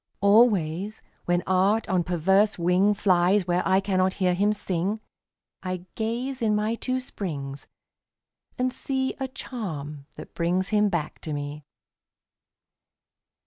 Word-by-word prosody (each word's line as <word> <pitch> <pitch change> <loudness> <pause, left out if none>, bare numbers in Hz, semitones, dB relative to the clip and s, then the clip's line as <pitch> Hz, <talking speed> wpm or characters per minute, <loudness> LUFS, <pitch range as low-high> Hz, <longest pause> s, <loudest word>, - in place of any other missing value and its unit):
Always, 200 -2 +3 0.2
when 175 0 +1
Art 195 +4 +2
on 185 -2 +1
perverse 190 +5 +2
wing 180 +4 +3
Flies 185 0 +3
where 175 0 +1
I 190 0 +4
cannot 190 -1 +1
hear 185 -2 +1
him 200 +4 +2
sing, 200 0 -2 0.6
I 185 -1 -4
gaze 240 +4 -3
in 215 -2 +2
my 210 +2 0
two 255 +2 -2
springs 145 - -6 0.9
and 255 0 0
see 265 -1 -1
A 265 - -2
charm 155 - -6
that - - -11
brings 180 +3 0
him 210 -1 +3
back 165 -5 -3
to 155 - -5
me. 145 0 -5
190 Hz, 130 wpm, -26 LUFS, 175-215 Hz, 0.9 s, I